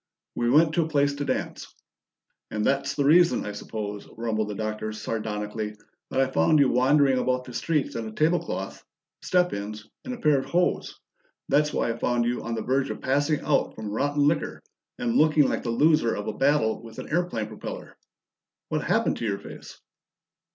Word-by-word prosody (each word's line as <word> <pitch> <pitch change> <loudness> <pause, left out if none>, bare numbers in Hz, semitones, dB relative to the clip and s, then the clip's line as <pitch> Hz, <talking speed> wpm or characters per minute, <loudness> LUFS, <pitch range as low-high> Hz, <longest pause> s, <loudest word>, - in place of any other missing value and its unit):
"We 120 - 0
went 155 +4 +5
to 170 - +2
a - - -3
place 145 -2 +2
to 145 0 -4
dance." - - -4 0.7
"And 105 0 -2
that's 140 0 0
the 145 - +1
reason, 170 +4 +5
I 105 - -3
suppose," 105 0 -6
rumbled 110 -2 -1
the 105 - -5
Doctor 110 0 -3
sardonically, 105 -1 -4 0.3
"that - - -1
I 135 - +5
found 130 - +3
you 140 -3 +5
wandering 135 +1 +4
about 125 0 0
the 125 - -11
streets 150 +2 -1
in 115 -1 -3
a - - -7
table 160 +9 +2
cloth, - - -6 0.4
step 180 -1 +2
ins, 105 +1 -6 0.2
and 255 -1 -5
a - - -11
pair 150 -8 +3
of - - -5
hose! 175 +1 0 0.5
That's 150 +1 +3
why 115 - 0
I 115 - -5
found 120 -1 +1
you 120 +1 -1
on 115 0 -3
the 110 - -3
verge 135 +1 0
of - - -5
passing 145 +3 +1
out 150 - +1
from 110 -2 -6
rotten 145 +6 +1
liquor, 155 - -1 0.3
and 245 -1 0
looking 155 -2 +5
like - - -1
the 120 - -4
loser 145 0 +3
of 105 - -4
a - - -2
battle 135 -6 +2
with 115 -1 -12
an - - -6
airplane 160 -10 -1
propellor! 110 0 -8 0.7
What - - -1
happened - - +1
to - - -4
your 100 -2 0
face?" 100 - -11
130 Hz, 195 wpm, -26 LUFS, 110-150 Hz, 0.7 s, went